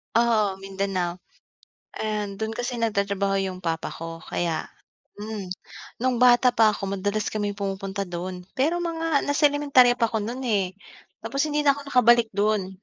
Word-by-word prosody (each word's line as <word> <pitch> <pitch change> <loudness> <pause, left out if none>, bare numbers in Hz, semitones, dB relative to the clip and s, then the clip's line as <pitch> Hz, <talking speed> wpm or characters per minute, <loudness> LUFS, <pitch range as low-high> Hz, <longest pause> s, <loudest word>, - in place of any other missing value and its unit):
Oo, 215 -5 +2
Mindanao. 195 -2 -2 0.8
And 210 -2 -3
do'n 220 +1 -2
kasi 245 +2 -3
nagtratrabaho 200 -3 0
'yong 190 -1 -3
papa 165 -1 -2
ko 165 0 -7
kaya 165 -2 -2 0.5
mm. 210 -3 -6 0.5
Nung 255 -1 +1
bata 250 0 +6
pa 220 -2 +5
ako 195 -1 -4
madalas 205 +2 -1
kami 205 -1 -1
pumupunta 195 0 -3
do'n, 180 +1 -6
pero 310 +7 +2
mga 330 -3 0
nasa 285 +1 +2
elementarya 270 -4 +4
pa 230 - +3
ako 220 -2 -1
no'n, 240 +5 -4
eh. 195 -6 0 0.5
Tapos 275 - -2
hindi 295 0 +1
na 280 - +6
ako 285 - -8
nakabalik 240 -3 +5
dun. 200 -2 0
210 Hz, 155 wpm, -25 LUFS, 195-245 Hz, 0.8 s, bata